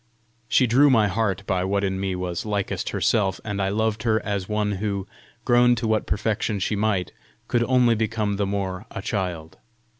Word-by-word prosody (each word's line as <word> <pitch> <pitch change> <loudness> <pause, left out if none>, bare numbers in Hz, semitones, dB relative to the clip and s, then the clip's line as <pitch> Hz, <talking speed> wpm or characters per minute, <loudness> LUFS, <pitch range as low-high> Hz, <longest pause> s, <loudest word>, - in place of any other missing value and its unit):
She 130 - +4
drew 130 +5 +5
my 110 -5 +4
heart 100 -2 -1
by 95 -2 0
what 100 +1 0
in 95 -1 -1
me 95 -1 -2
was 90 -2 -3
likest 105 -2 -2
herself, 100 -5 +1
and 105 -2 -2
I 95 - +1
loved 110 +1 0
her 110 -2 +2
as 100 -2 -2
one 105 -1 0
who, 100 -1 -2 0.4
grow 120 0 +5
to 115 -1 -2
what 110 -1 0
perfection 105 +3 -1
she 100 +2 -1
might, 100 -5 0 0.4
could 120 -1 +1
only 125 -2 +4
become 110 -2 -1
the 100 -1 0
more 95 0 -3
a 95 - -7
child. 90 -7 -3
105 Hz, 185 wpm, -24 LUFS, 95-110 Hz, 0.4 s, drew